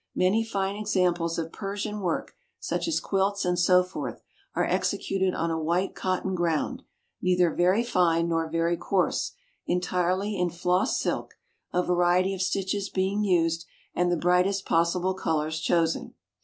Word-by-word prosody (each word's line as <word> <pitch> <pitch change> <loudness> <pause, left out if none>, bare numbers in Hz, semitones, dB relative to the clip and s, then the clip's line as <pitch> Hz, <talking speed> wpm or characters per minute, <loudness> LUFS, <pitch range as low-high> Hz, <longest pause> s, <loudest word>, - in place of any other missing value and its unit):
Many 195 +5 +3
fine 200 -3 -2
examples 180 -5 0
of 165 -1 -3
Persian 205 +1 -4
work, 180 -4 -2 0.2
such - - -2
as 330 - +1
quilts 195 0 0
and 180 -1 +1
so 180 +1 +5
forth, 180 +1 -6 0.3
are - - +2
executed 190 -1 0
on 165 +1 -1
a 160 - -1
white 175 +4 0
cotton 190 0 -1
ground, 170 -3 -1 0.4
neither 180 -2 +3
very 185 +6 +3
fine 175 -7 +2
nor 165 -1 0
very 165 +1 +1
coarse, 190 +1 0 0.3
entirely 185 +3 0
in 180 0 +2
floss 180 +2 +1
silk, - - -2 0.4
a 180 - +1
variety 180 +2 +2
of 190 - -4
stitches 195 +1 -1
being 195 +2 0
used, 165 -4 +1 0.3
and 175 0 +1
the 175 - +2
brightest 180 +3 +2
possible 175 +3 +1
colours 160 -3 -1
chosen. 165 -1 0
180 Hz, 150 wpm, -27 LUFS, 170-195 Hz, 0.4 s, so